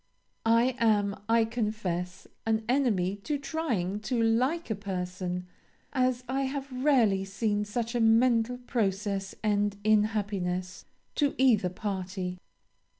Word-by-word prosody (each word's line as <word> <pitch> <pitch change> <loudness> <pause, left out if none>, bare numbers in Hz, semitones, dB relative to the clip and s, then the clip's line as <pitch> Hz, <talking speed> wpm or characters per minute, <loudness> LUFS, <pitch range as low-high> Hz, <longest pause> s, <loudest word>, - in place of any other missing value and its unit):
"I 235 +2 +4
am, 205 -3 +3
I 230 0 +4
confess, 210 -6 -3 0.2
an 220 0 +1
enemy 215 -8 +1
to 290 +9 -2
trying 240 - -2
to 235 +3 -2
like 245 +7 +1
a - - +1
person, 180 -2 -4 0.5
as 255 -2 +1
I 265 +2 0
have 275 0 -4
rarely 230 -10 +4
seen 205 +1 -1
such 230 +3 -3
a 240 - 0
mental 230 +1 +4
process 200 -5 -2
end 205 -1 +1
in 215 0 +5
happiness 190 -4 -3 0.3
to 290 -2 +1
either 225 -8 +4
party. 185 -1 -4
215 Hz, 125 wpm, -29 LUFS, 195-245 Hz, 0.5 s, in